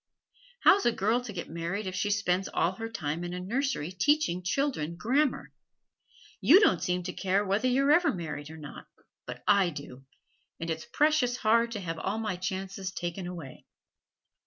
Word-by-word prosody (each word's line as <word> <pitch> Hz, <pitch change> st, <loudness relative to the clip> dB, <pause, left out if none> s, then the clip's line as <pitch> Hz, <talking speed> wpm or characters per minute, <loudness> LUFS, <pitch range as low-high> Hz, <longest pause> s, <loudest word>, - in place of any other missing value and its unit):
How's 400 Hz, -, +5 dB
a -, -, +5 dB
girl 225 Hz, +3 st, +1 dB
to 225 Hz, -, -5 dB
get 180 Hz, -4 st, -6 dB
married 170 Hz, +5 st, -3 dB
if 185 Hz, -, -4 dB
she 190 Hz, +2 st, -1 dB
spends 195 Hz, -2 st, +1 dB
all 170 Hz, -, +1 dB
her 225 Hz, +4 st, -6 dB
time 155 Hz, -5 st, -3 dB
in 175 Hz, 0 st, -4 dB
a -, -, -4 dB
nursery 220 Hz, -, -2 dB
teaching 235 Hz, -, +1 dB
children 185 Hz, -, -1 dB
grammar? 260 Hz, -, 0 dB, 0.9 s
You 350 Hz, +7 st, +7 dB
don't 185 Hz, -, +3 dB
seem 180 Hz, 0 st, -1 dB
to 180 Hz, +1 st, -5 dB
care 195 Hz, +1 st, 0 dB
whether 205 Hz, +6 st, +1 dB
you're 275 Hz, +3 st, +3 dB
ever 340 Hz, +3 st, +5 dB
married 150 Hz, -5 st, -6 dB
or 160 Hz, -, -10 dB
not, 150 Hz, -2 st, -10 dB, 0.4 s
but -, -, -7 dB
I 200 Hz, -3 st, +5 dB
do, 140 Hz, -4 st, -9 dB, 0.6 s
and 165 Hz, 0 st, -3 dB
it's 160 Hz, 0 st, -4 dB
precious 295 Hz, -5 st, +2 dB
hard 230 Hz, +1 st, +3 dB
to 210 Hz, -, -4 dB
have 165 Hz, -2 st, -4 dB
all 200 Hz, +6 st, -2 dB
my 215 Hz, -5 st, -2 dB
chances 190 Hz, +1 st, -4 dB
taken 175 Hz, 0 st, -4 dB
away. 165 Hz, -7 st, -9 dB
190 Hz, 180 wpm, -29 LUFS, 175-235 Hz, 0.9 s, You